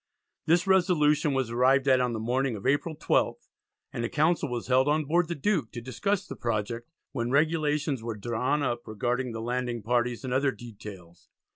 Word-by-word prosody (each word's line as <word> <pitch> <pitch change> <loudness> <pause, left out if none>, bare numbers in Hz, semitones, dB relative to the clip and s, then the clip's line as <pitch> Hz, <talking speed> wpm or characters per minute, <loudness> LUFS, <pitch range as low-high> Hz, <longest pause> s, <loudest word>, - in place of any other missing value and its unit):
This 170 +2 +3
resolution 155 -6 +3
was 130 -3 -1
arrived 130 +3 +3
at 130 -1 +5
on 125 -1 0
the 115 - -3
morning 125 +2 0
of 100 - -9
April 145 +4 +1
12th - - 0 0.4
and 115 - -3
a 120 - -1
council 155 0 +1
was 120 -1 -4
held 130 +1 +3
on 150 +1 +2
board 170 +4 +2
the 170 - -3
Duke 155 - 0
to 120 - -5
discuss 195 - -2
the - - -8
project, 115 +1 -3 0.2
when 120 -3 -2
regulations 150 -1 +1
were 115 -1 -5
drawn 120 +7 -1
up 120 -2 -2
regarding 120 +3 -2
the 115 0 -5
landing 120 -1 -2
parties 120 +2 0
and 125 - -2
other 135 +2 +2
details. 100 -7 -10
130 Hz, 185 wpm, -28 LUFS, 120-150 Hz, 0.4 s, at